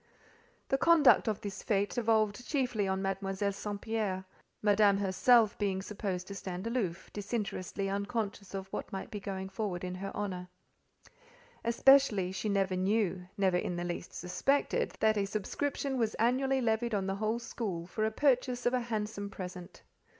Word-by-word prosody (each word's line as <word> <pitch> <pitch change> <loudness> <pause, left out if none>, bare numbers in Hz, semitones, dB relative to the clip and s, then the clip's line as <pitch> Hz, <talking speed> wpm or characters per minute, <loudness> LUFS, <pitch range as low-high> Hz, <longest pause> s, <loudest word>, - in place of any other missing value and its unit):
The 270 - +2
conduct 325 -7 +6
of 215 -2 -1
this 200 -2 -5
fête 205 -1 +1
devolved 220 -1 +1
chiefly 250 -8 0
on 190 0 -1
Mademoiselle 195 +1 -1
St. 205 +1 -5
Pierre: 205 -4 -2 0.4
Madame 205 -1 +5
herself 210 +3 +4
being 195 -2 0
supposed 190 -2 -4
to - - -5
stand 185 0 -5
aloof, 225 -8 -2
disinterestedly 200 -2 -3
unconscious 200 0 -3
of 190 -1 -4
what - - -4
might 195 - -5
be 210 - -4
going 195 -1 -4
forward 190 -2 -3
in 180 0 -3
her 195 +2 -5
honour. 185 -3 -3 1.2
Especially, 235 -5 +5
she 190 +3 -3
never 195 -2 +1
knew, 190 -1 0
never 190 -3 +3
in 180 - -2
the 175 - -3
least 175 0 -4
suspected, 275 +11 +1
that 220 0 +4
a 200 - +1
subscription 265 +6 -2
was 225 -2 0
annually 260 +3 +2
levied 225 -1 +1
on 195 -2 0
the 195 0 -2
whole 215 +2 0
school 210 -7 -4
for 215 +5 -3
the 220 - +3
purchase 250 0 +1
of 245 - +3
a 255 - +3
handsome 210 -3 -3
present. 180 -2 -8
205 Hz, 165 wpm, -32 LUFS, 190-230 Hz, 1.2 s, conduct